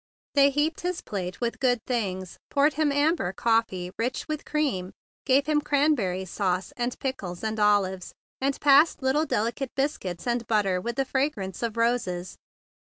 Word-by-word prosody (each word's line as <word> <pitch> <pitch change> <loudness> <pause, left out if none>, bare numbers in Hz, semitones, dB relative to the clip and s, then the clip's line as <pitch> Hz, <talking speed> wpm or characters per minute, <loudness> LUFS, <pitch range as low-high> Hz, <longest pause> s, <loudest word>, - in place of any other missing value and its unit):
They 280 -1 +6
heaped 295 +3 0
his 360 0 -2
plate 185 -2 -5
with 235 -1 -2
good 245 -3 +2
things, 190 -7 -3
poured 285 +2 +3
him 305 -2 +1
amber 285 - +1
coffee 225 -6 0
rich 245 +3 -2
with 310 -1 -4
cream, 260 -12 -1 0.3
gave 275 +1 +4
him 300 -1 +2
cranberry 275 -12 +1
sauce 185 0 -2
and 240 0 -2
pickles 195 -10 -4
and 220 0 -2
olives, 195 -3 +2 0.3
and 275 +1 -1
passed 290 +1 +5
little 295 +4 +2
delicate 235 +5 -1
biscuits, 235 - -2
and 240 -1 -1
butter 195 -4 +1
with 235 +4 -3
the 270 - 0
fragrance 260 - -2
of 230 -2 -2
roses. 205 -7 0
235 Hz, 160 wpm, -26 LUFS, 190-280 Hz, 0.3 s, They